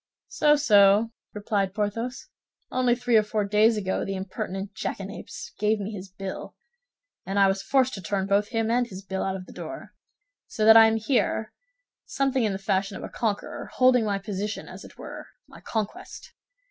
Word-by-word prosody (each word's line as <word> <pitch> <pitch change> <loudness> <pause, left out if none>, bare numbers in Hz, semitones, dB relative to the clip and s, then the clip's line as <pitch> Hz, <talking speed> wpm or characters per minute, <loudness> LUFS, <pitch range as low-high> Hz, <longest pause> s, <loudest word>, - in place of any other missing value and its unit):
"So, 295 0 +4
so," 210 -5 +5 0.2
replied 200 -2 -1
Porthos. 230 - -3 0.4
"Only 250 -1 +2
three 245 -2 +2
or - - +6
four 210 0 -1
days 215 +2 +4
ago 190 -2 -1
the 195 - -3
impertinent 190 +1 -5
jackanapes 200 0 -6
gave 210 +1 +2
me 200 +1 -4
his 195 -2 -8
bill, 190 0 -7 0.7
and 195 +1 -3
I 200 - +6
was 195 0 0
forced 260 +5 +2
to 195 - -6
turn 190 +2 -1
both 200 +1 +2
him 225 0 -1
and 245 0 +2
his 195 -2 -9
bill 190 0 -4
out 190 - -1
of 185 -1 -7
the - - -13
door; - - -8 0.5
so 215 - -1
that 220 0 +9
I 225 0 +9
am 220 - +1
here 220 -2 0 0.5
something 270 - 0
in 215 - +1
the - - -2
fashion 195 0 -1
of - - -9
a - - -6
conqueror, 215 -3 -3
holding 255 -2 +4
my 205 -2 0
position, 205 +1 -4
as - - -10
it - - -14
were, - - -9 0.2
my - - -15
conquest. 225 - -5
210 Hz, 185 wpm, -26 LUFS, 195-230 Hz, 0.7 s, that